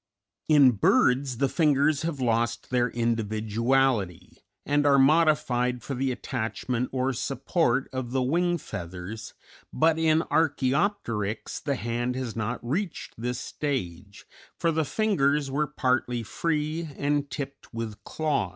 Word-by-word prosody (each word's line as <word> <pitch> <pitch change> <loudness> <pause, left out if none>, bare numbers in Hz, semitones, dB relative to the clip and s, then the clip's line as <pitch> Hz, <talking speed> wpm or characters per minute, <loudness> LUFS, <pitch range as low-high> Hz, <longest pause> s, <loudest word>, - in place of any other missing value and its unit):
In 145 -4 +7
birds 125 +4 +2
the 135 +2 +2
fingers 145 +1 +2
have 160 -4 -3
lost 120 -1 0
their 125 -1 +2
individuality, 115 -2 0 0.3
and 145 0 +2
are 140 -1 +5
modified 135 -5 +3
for 140 - -4
the 135 +1 -1
attachment 125 0 -3
or 130 0 0
support 130 +2 0
of 130 -2 -3
the 130 +1 0
wing 175 +6 +1
feathers, 95 - -7 0.4
but 160 +3 +2
in 160 0 +3
Archæopteryx 135 - 0
the 140 -2 -1
hand 120 +1 -2
had 130 -3 -4
not 115 +2 -3
reached 175 +7 -3
this 120 +2 -3
stage, 100 - -4 0.3
for 165 - +1
the 160 -1 0
fingers 150 -9 +1
were 150 +2 0
partly 125 -4 0
free 155 +5 -2
and 145 0 0
tipped 140 -2 -7
with 115 -2 -6
claws. 145 - -1
130 Hz, 130 wpm, -27 LUFS, 115-150 Hz, 0.4 s, In